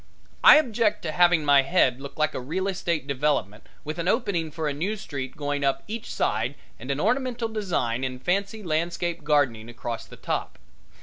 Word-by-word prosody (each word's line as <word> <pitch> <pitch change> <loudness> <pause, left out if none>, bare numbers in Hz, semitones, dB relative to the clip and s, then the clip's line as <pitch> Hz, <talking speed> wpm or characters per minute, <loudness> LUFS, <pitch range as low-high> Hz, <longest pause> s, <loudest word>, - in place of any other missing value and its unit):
I - - +11
object 230 -7 +2
to 160 - -2
having 175 -1 +4
my 140 -1 +6
head 135 -4 +2
look 140 - -9
like 155 0 +1
a - - -3
real 170 +10 -2
estate 175 -6 -1
development 140 -7 -1 0.2
with 155 +2 -5
an 170 - -2
opening 185 -7 0
for 155 0 -3
a 145 - -1
new 190 +9 -2
street 135 -8 -6
going 145 -1 -2
up 135 -1 +1
each 220 +2 -6
side 115 +6 0 0.2
and 125 - -9
an 140 0 -1
ornamental 240 - 0
design 170 - -1
in 130 -1 -3
fancy 200 - -1
landscape 170 0 -1
gardening 140 -7 +1
across 120 -1 -6
the - - -13
top. - - -3
155 Hz, 185 wpm, -25 LUFS, 135-190 Hz, 0.2 s, I